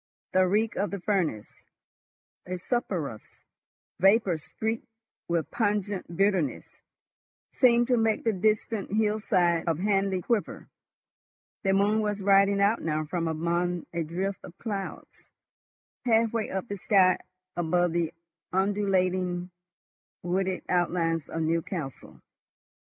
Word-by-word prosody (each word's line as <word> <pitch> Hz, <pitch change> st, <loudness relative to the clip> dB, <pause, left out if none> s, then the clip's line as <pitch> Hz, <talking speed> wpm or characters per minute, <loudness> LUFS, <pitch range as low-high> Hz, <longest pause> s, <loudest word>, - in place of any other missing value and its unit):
The 185 Hz, 0 st, +4 dB
reek 215 Hz, +4 st, +1 dB
of 205 Hz, -, 0 dB
the 200 Hz, -, -4 dB
furnace, 175 Hz, -, 0 dB, 1.0 s
a 185 Hz, 0 st, -3 dB
sulphurous 175 Hz, -, -2 dB, 0.8 s
vapor 195 Hz, -3 st, +4 dB
streaked 220 Hz, +8 st, -4 dB, 0.4 s
with 165 Hz, -3 st, -1 dB
pungent 205 Hz, -5 st, -1 dB
bitterness, 195 Hz, -8 st, +1 dB, 0.9 s
seemed 240 Hz, -2 st, +4 dB
to 250 Hz, -, +4 dB
make 225 Hz, -1 st, +1 dB
the 225 Hz, -, +2 dB
distant 210 Hz, +1 st, 0 dB
hillside 210 Hz, -5 st, +2 dB
of 165 Hz, -3 st, +1 dB
Hanley 195 Hz, -1 st, +1 dB
quiver. 230 Hz, -4 st, -1 dB, 0.9 s
The 195 Hz, -1 st, +2 dB
moon 205 Hz, +2 st, +3 dB
was 210 Hz, -1 st, -1 dB
riding 200 Hz, 0 st, +4 dB
out 205 Hz, +3 st, +3 dB
now 155 Hz, -1 st, -1 dB
from 165 Hz, +2 st, -2 dB
among 170 Hz, +2 st, -1 dB
a 170 Hz, -, -1 dB
drift 185 Hz, +5 st, -3 dB
of 175 Hz, -, -12 dB
clouds, 200 Hz, -4 st, -6 dB, 0.8 s
halfway 230 Hz, -1 st, +2 dB
up 190 Hz, +4 st, -3 dB
the 200 Hz, -, -4 dB
sky 190 Hz, -2 st, +4 dB, 0.4 s
above 175 Hz, +1 st, +1 dB
the 170 Hz, -1 st, 0 dB, 0.4 s
undulating 185 Hz, -2 st, 0 dB, 0.7 s
wooded 185 Hz, +1 st, -1 dB
outlines 170 Hz, -3 st, 0 dB
of 165 Hz, -, -2 dB
Newcastle. 160 Hz, -3 st, -3 dB
190 Hz, 115 wpm, -27 LUFS, 170-210 Hz, 1.0 s, The